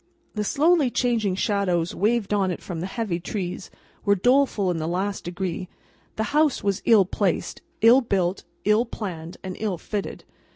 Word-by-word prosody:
The 210 - -2
slowly 300 - +3
changing 230 -6 0
shadows 185 -4 0
waved 215 0 +1
on 195 -2 +2
it 180 - -3
from 175 -3 -5
the 180 - -3
heavy 195 -5 -2
trees, 185 0 -5 0.3
were 200 0 +4
doleful 245 -3 +2
in 175 - -2
the 160 0 -2
last 195 +4 -2
degree; 180 0 -4 0.5
the 220 - -1
house 300 -5 +2
was 200 -2 0
ill 215 -5 +6
placed, 190 0 -1 0.2
ill 235 +4 +7
built, 190 -5 0 0.2
ill 210 +3 +4
planned, 175 -8 -6
and 185 -1 -5
ill 210 -5 -1
fitted. 205 +4 -5
200 Hz, 165 wpm, -24 LUFS, 180-225 Hz, 0.5 s, ill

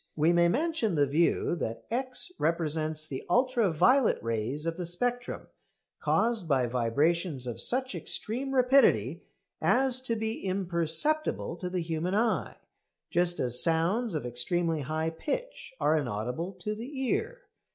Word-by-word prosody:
We 160 +3 +3
may 170 0 +4
mention 280 - 0
the 145 -1 +4
view 160 +4 +1
that 115 -6 -4
X 255 +7 -1
represents 155 -1 -1
the 135 -3 -6
ultra 245 -5 +2
violet 255 - +4
rays 115 +6 -2
of 165 0 -1
the 175 -1 -5
spectrum, 245 +8 -2 0.5
caused 225 -6 +1
by 135 -4 +2
vibrations 135 +5 0
of 120 -2 -3
such 260 0 0
extreme 235 - -2
rapidity 260 +2 +4 0.4
as 260 0 +3
to 230 - 0
be 220 0 -3
imperceptible 185 - 0
to 180 - -4
the 180 -1 -2
human 165 +3 -2
eye, 225 +1 0 0.5
just 175 0 +1
as 125 -1 +4
sounds 175 +6 +2
of 150 - -3
extremely 160 +7 0
high 155 +4 -2
pitch - - -5
are 155 - +3
inaudible 125 - -3
to 185 +3 -4
the 250 +6 -7
ear. 485 - -1
175 Hz, 140 wpm, -29 LUFS, 155-240 Hz, 0.5 s, may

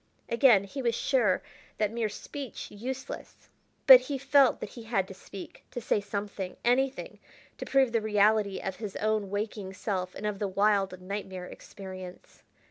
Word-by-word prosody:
Again 235 -4 +5
he 270 +8 -6
was 235 -2 +1
sure 235 -10 +2 0.3
that 210 -1 +1
mere 230 -2 -1
speech 265 +4 -7
useless, 255 +5 -7 0.4
but 260 -2 +12
he 270 +2 -4
felt 275 0 +4
that - - -5
he 240 - -9
had 225 -4 -1
to 190 - -9
speak, 190 0 -11
to - - -5
say 215 -2 +1
something, 200 -2 -5
anything, 260 +2 +1 0.4
to - - -4
prove 265 -3 +3
the 230 -1 +1
reality 210 -1 +3
of 190 -1 -4
his 210 -4 -6
own 215 -2 0
waking 205 -1 -4
self 185 -2 -3
and 210 - -6
of 210 -2 -2
the 205 - 0
wild, 195 -1 +1
nightmare 190 -1 -5
experience. 185 -1 -10
210 Hz, 165 wpm, -29 LUFS, 195-240 Hz, 0.4 s, but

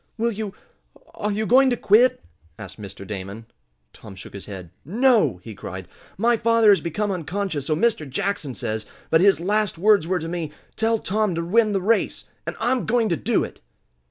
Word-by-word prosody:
"Will 230 +1 +1
you 210 -2 -5 0.6
are 210 - -2
you 215 +2 -1
going 260 +4 +5
to 245 - 0
quit?" 225 - +4 0.3
asked 105 -1 -10
Mr. 100 -1 -9
Damon. 100 +2 -7 0.5
Tom 100 - -12
shook 95 - -11
his 100 - -9
head. 95 -5 -8
"No!" 210 - +3
he 115 - -8
cried. 95 -2 -8 0.3
"My 235 +3 +3
father 230 -1 +4
has 195 - +4
become 200 +5 -2
unconscious, 180 -4 -3
so 155 - +1
Mr. 210 -7 0
Jackson 145 -2 -2
says, 110 -1 -4 0.2
but 160 - +5
his 195 -1 +5
last 205 +2 0
words 200 -2 +4
were 185 +1 +1
to 165 -1 -5
me: 165 -3 -4 0.2
'Tell 225 +1 +1
Tom 210 -2 -1
to 170 0 -2
win 215 +3 +3
the 195 - 0
race!' 225 +3 +1 0.2
And - - -3
I'm 255 0 0
going 230 -1 +2
to 170 - +2
do - - +1
it!" - - -8
195 Hz, 190 wpm, -23 LUFS, 140-220 Hz, 0.6 s, going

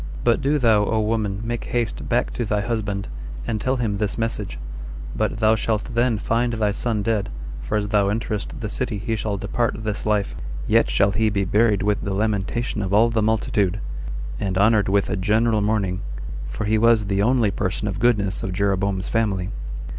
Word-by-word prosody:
But 120 -1 +3
do 145 +2 +2
thou, 110 -6 +4
O 110 +1 +1
woman, 105 -2 0
make 120 +1 -3
haste 120 -2 -2
back - - +1
to 120 - -2
thy 105 -2 0
husband, 105 -3 -2 0.4
and 110 -3 -2
tell 130 +3 +1
him 110 -5 -1
this 105 -1 -1
message; 115 -3 -2 0.6
but - - 0
thou 110 0 +4
shalt 110 +1 -1
then 120 -1 +2
find 115 +3 0
thy 110 -2 +1
son 105 0 -1
dead, 105 -3 0 0.3
for 105 - -1
as 105 -1 -1
thou 100 -2 +3
enterest 105 +1 -3
the 110 - -2
city 115 +1 -2
he 115 +3 -2
shall 105 -1 -2
depart 110 +2 -1
this 105 -1 -2
life; 105 -2 +1 0.3
yet - - +3
shall 100 +1 +3
he 110 +2 +2
be 100 -1 0
buried 105 +1 +3
with 105 0 +1
the 100 -1 -2
lamentation 105 +2 -1
of 95 0 0
all 115 +2 +5
the 115 -1 +1
multitude, 105 -3 +1 0.6
and 95 -2 -1
honored 105 0 +4
with 100 0 +2
a - - -1
general 110 +3 +2
mourning, 100 -3 0 0.5
for 70 +12 -3
he 110 +1 +2
was 115 -1 +4
the 100 0 +1
only 115 -2 +3
person 100 +2 -1
of 100 -1 -3
goodness 105 -4 +2
of 95 - -3
Jeroboam's 100 0 0
family." 100 -5 0
105 Hz, 190 wpm, -23 LUFS, 100-115 Hz, 0.6 s, all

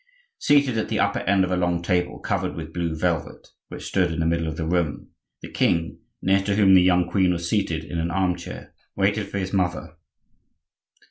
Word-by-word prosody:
Seated 140 -5 +3
at - - -3
the - - -1
upper - - +1
end 100 0 +2
of 95 - -2
a - - +2
long 90 -1 0
table 90 -1 0
covered - - -2
with 80 0 -7
blue 85 -2 -2
velvet, 85 0 -2 0.2
which - - -9
stood 90 -3 +1
in 80 - -4
the 80 - +1
middle 85 0 0
of 80 - -4
the 80 - -2
room, 85 -3 -1 0.3
the - - -8
king, 85 -1 0 0.2
near 95 +1 +3
to 100 +1 -1
whom 100 -2 +5
the 95 - +8
young 90 -1 +3
queen 95 -3 +2
was 85 -1 -2
seated 85 -6 -1
in 85 +1 -5
an 85 +1 -1
arm 90 0 +1
chair, 85 - -9 0.2
waited 100 +2 +1
for - - -5
his 95 0 -3
mother. 90 -4 -1
90 Hz, 210 wpm, -24 LUFS, 85-95 Hz, 0.3 s, the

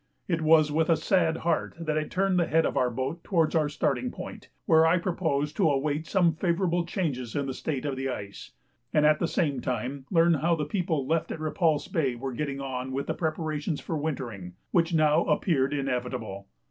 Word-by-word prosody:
It 165 -3 0
was 155 -1 +5
with 160 +2 +1
a 165 - +4
sad 165 -4 +2
heart 170 -2 0
that 155 -2 -2
I 155 0 0
turned 190 +2 +1
the 170 - +1
head 165 0 +3
of - - -1
our 125 - +2
boat 130 +7 -4
towards 165 -5 +1
our 155 -3 +2
starting 250 - -1
point, - - -9 0.2
where 160 -4 +5
I 165 +2 +4
purposed 160 -5 -1
to 160 - +4
await 145 +2 -1
some 175 -3 +3
favourable 175 +1 0
change 140 - -3
in 140 -1 0
the 135 - -3
state 140 0 -3
of 140 -2 -1
the 135 +1 -2
ice, 100 -5 -7 0.4
and 150 -1 +3
at 150 0 +4
the 170 - +1
same 145 -7 0
time 130 +2 -3
learn 170 -1 +4
how 165 +3 +2
the 150 -2 -2
people 160 -4 -1
left 160 +3 0
at - - -5
Repulse 155 -1 +1
Bay 135 -6 0
were 130 +2 -5
getting 140 +1 -3
on 130 -1 -4
with 135 +1 -2
preparations 155 -1 -2
for 165 - -4
wintering, 120 - -4 0.2
which 170 -1 +2
now 155 -2 +4
appeared 140 -6 +1
inevitable. 125 -7 -3
155 Hz, 200 wpm, -27 LUFS, 135-165 Hz, 0.4 s, was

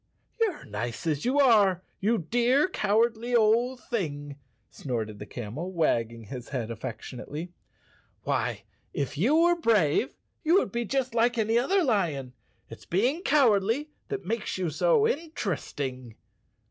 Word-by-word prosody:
"You're 425 -9 0
nice 115 - -5
as 150 +1 -1
you 265 +4 +2
are, 205 -9 +5 0.2
you 225 +4 +2
dear 245 - +2
cowardly 230 - +1
old 235 +3 +3
thing," 145 - -4 0.3
snorted 110 -6 -4
the 105 - -8
camel, 125 - -6
wagging 115 -9 0
his 125 +3 -8
head 125 -5 -3
affection¬ 115 +1 -6
ately. 155 +5 -6 0.4
" - - -35
Why, - - -1 0.3
if 140 0 -2
you 225 - +2
were 345 +2 +5
brave, 225 - +2 0.3
you 330 +2 +4
would 380 - +2
be 235 +2 -2
just 260 +1 -1
like 235 +1 +2
any 220 0 +1
other 375 +9 +2
lion. 155 - 0 0.3
It's - - -11
being 245 - +1
cowardly 265 - +2 0.2
that 410 -2 -4
makes 225 -3 -2
you 180 -4 -1
so 465 - +3
interesting." 145 - -4
210 Hz, 145 wpm, -27 LUFS, -, 0.4 s, are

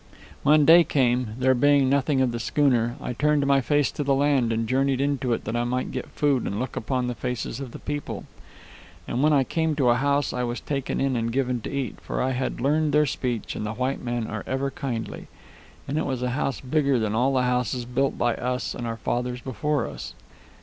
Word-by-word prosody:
"When 150 0 +5
day 170 +2 +8
came, 125 -6 +1
there 130 0 +3
being 140 +1 +4
nothing 135 0 +2
of 130 -2 +2
the 120 - -4
schooner, 120 -1 +1
I - - -4
turned 150 +2 +2
my 140 -1 +4
face 145 0 +1
to 145 - -3
the 140 -1 +2
land 135 -4 +2
and 115 0 -1
journeyed 135 +1 +1
into 135 -3 0
it - - -3
that 110 - -3
I 120 - +1
might 125 +1 -2
get 130 - -4
food 140 -4 0
and 100 - -3
look 130 0 -4
upon 125 +2 -1
the 125 - -2
faces 125 -1 -4
of 135 -2 -6
the - - -8
people. 145 0 -5 0.8
And 125 - -1
when 155 +1 +4
I 140 -3 +4
came 160 +3 -1
to 135 -4 +3
a 120 - +5
house 140 +1 +1
I - - -2
was 120 0 -2
taken 135 -2 -3
in 135 -1 +1
and 115 0 -1
given 125 -1 0
to - - -5
eat, 140 -2 -4
for - - -4
I 130 - +1
had 130 0 -2
learned 150 +3 +1
their 150 0 +5
speech, 125 -4 -3
and - - -4
the 105 +1 -3
white 130 +4 -2
men 120 -2 -2
are 110 -2 -5
ever 135 +1 -1
kindly. 130 -7 -5 0.6
And 145 +3 -1
it - - -1
was 130 -2 -2
a 125 - 0
house 135 0 -2
bigger 140 0 +1
than 110 -2 -1
all 125 +5 +2
the 130 - +3
houses 125 -1 0
built 135 +3 0
by 120 -1 +2
us 125 +1 -2
and 120 - -5
our 115 0 -3
fathers 125 +3 -2
before 135 +2 -1
us." - - -8
130 Hz, 230 wpm, -25 LUFS, 120-140 Hz, 0.8 s, day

